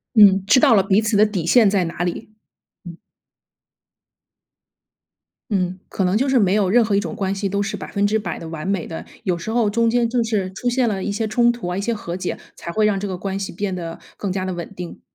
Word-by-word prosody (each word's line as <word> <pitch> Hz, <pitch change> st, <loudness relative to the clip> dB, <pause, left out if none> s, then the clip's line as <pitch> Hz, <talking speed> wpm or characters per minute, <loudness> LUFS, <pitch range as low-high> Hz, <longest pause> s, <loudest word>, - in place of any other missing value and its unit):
嗯， 195 Hz, -3 st, +7 dB
知 205 Hz, -, +5 dB
道 230 Hz, -, +6 dB
了 200 Hz, -, +5 dB
彼 195 Hz, +2 st, +3 dB
此 220 Hz, -1 st, 0 dB
的 210 Hz, -, +6 dB
底 190 Hz, -6 st, -3 dB
线 220 Hz, +4 st, +5 dB
在 195 Hz, -2 st, +1 dB
哪 165 Hz, +1 st, -4 dB
里。 175 Hz, +4 st, -4 dB, 0.6 s
嗯。 170 Hz, -1 st, -9 dB, 2.5 s
嗯， 185 Hz, -2 st, -1 dB
可 195 Hz, -, -2 dB
能 180 Hz, +1 st, +1 dB
就 260 Hz, +6 st, +1 dB
是 265 Hz, -1 st, +4 dB
没 195 Hz, -5 st, +3 dB
有 205 Hz, -3 st, +2 dB
任 235 Hz, +5 st, +4 dB
何 210 Hz, -2 st, 0 dB
一 200 Hz, -, +3 dB
种 170 Hz, -6 st, -5 dB
关 195 Hz, -1 st, -1 dB
系， 200 Hz, 0 st, -2 dB
都 200 Hz, +1 st, -1 dB
是 205 Hz, -, -3 dB
100% 205 Hz, -1 st, -1 dB
的 165 Hz, -, -8 dB
完 165 Hz, +2 st, -5 dB
美 195 Hz, -4 st, -1 dB
的。 160 Hz, -, -7 dB, 0.2 s
有 180 Hz, -4 st, 0 dB
时 170 Hz, -, -5 dB
候 225 Hz, -2 st, +2 dB
中 230 Hz, +2 st, +2 dB
间 235 Hz, +1 st, +2 dB
就 240 Hz, 0 st, +1 dB
是 210 Hz, -5 st, -1 dB
出 245 Hz, +6 st, -3 dB
现 245 Hz, 0 st, +2 dB
了 200 Hz, -4 st, -1 dB
一 -, -, -2 dB
些 215 Hz, +2 st, -1 dB
冲 235 Hz, +2 st, +3 dB
突 240 Hz, -5 st, -4 dB
啊、 180 Hz, -, -2 dB
一 -, -, -1 dB
些 235 Hz, +3 st, -1 dB
和 175 Hz, -5 st, -6 dB
解， 180 Hz, 0 st, -4 dB, 0.2 s
才 -, -, -7 dB
会 215 Hz, +5 st, +1 dB
让 205 Hz, -2 st, +2 dB
这 205 Hz, -, -3 dB
个 185 Hz, -, -3 dB
关 195 Hz, +1 st, -4 dB
系 195 Hz, -, -4 dB
变 195 Hz, +1 st, -3 dB
得， 165 Hz, -2 st, -6 dB, 0.2 s
更 200 Hz, -, -3 dB
加 185 Hz, 0 st, -2 dB
的 185 Hz, -, -3 dB
稳 175 Hz, -1 st, -6 dB
定。 180 Hz, -2 st, -8 dB
200 Hz, 260 characters per minute, -21 LUFS, 185-220 Hz, 2.5 s, 嗯